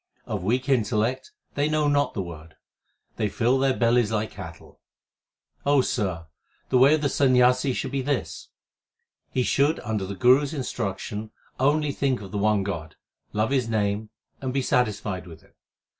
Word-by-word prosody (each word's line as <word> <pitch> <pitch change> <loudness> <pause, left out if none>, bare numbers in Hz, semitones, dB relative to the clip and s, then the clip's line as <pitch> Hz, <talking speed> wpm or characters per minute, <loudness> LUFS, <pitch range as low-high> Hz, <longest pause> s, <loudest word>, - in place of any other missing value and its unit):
Of 105 -3 -3
weak 125 +7 0
intellect, 120 - 0 0.2
they 145 +1 0
know 155 -1 +1
not 145 0 +1
the 100 - -1
Word; 80 -2 -10 0.6
they 105 - 0
fill 125 +5 +1
their 135 -1 +2
bellies 120 -2 +3
like 110 0 -1
cattle. 85 -5 -11 1.0
Sir, 90 -10 -2 0.4
the 130 - +3
way 140 +4 +7
of 155 - -3
the - - +3
Sanyasi 130 0 +3
should - - -3
be 140 -1 -1
this: 140 0 -3 0.8
He 130 - 0
should 145 +6 +2
under 105 -3 -2
the 100 - -5
Guru 125 +8 +5
s 145 +1 -4
instruction 110 -5 -4 0.3
only 145 +2 +2
think 135 -2 0
of 100 -2 -10
the 105 - -2
one 105 -1 +2
God, 80 -5 -5 0.4
love 110 +3 0
His 130 -4 +1
name, 105 0 -1 0.3
and 130 -1 -2
be 135 0 0
satisfied 105 -7 0
with 80 -2 -12
it. - - -26
120 Hz, 165 wpm, -25 LUFS, 105-135 Hz, 1.0 s, way